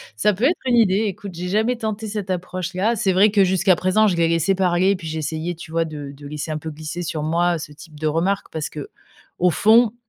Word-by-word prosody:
Ça 210 - +2
peut 210 +6 -5
être 325 +6 +3
une 245 - +3
idée, 215 -2 +3
écoute, 200 -1 -6
j'ai 180 +2 -5
jamais 220 +6 +1
tenté 220 -1 -4
cette 205 -2 -5
approche-là. 185 +4 -1
C'est 195 -2 +1
vrai, 200 +3 +5
que 200 -2 +4
jusqu'à 185 0 +3
présent, 185 +5 +2
je 185 - +1
les 170 -1 +2
laissais 165 +3 +2
parler 185 0 +2
et 200 - +1
puis 170 -3 -8
j'essayais, 160 +2 -3
tu 160 -1 -11
vois, 165 0 +1
de 145 -3 -7
de 145 +1 -11
laisser 150 +2 -5
un 155 - -2
peu 160 - -6
glisser 155 +3 -6
sur 155 -3 -3
moi, 170 +2 +1
heu, - - -2
ce 150 -1 -8
type 150 0 -14
de 155 - -4
remarque. 180 +6 -1
Parce 155 -2 -4
qu'au 165 +4 -4
fond, 220 +5 +4
180 Hz, 245 wpm, -21 LUFS, 160-200 Hz, -, vrai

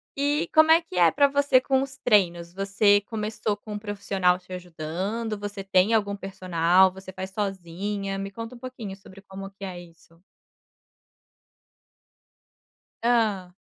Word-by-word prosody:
E 290 +4 0
como 315 0 +6
é 330 +1 +7
que 185 - -9
é 170 -2 +6
para 285 0 +4
você 280 -2 +3
com 265 0 +1
os 270 -1 -5
treinos, 175 -6 +2
você 200 +1 +3
começou 215 -1 -3
com 210 +1 -10
um 210 - -4
profissional 195 -3 0
te 180 +1 -19
ajudando, 180 +6 -4
você 205 -1 -6
tem 195 +3 +3
algum 205 -2 +1
personal, 185 -1 +2
você 190 0 -11
faz 190 0 -6
sozinha? 195 0 -4
Me 195 0 -5
conta 230 +4 -8
um - - -13
pouquinho 235 -6 -7
sobre 195 0 -15
como 195 0 -9
que 195 0 -14
é 180 -2 -6
isso. 165 0 -18 2.8
Hã. 215 -6 +1
195 Hz, 150 wpm, -25 LUFS, 185-225 Hz, 2.8 s, é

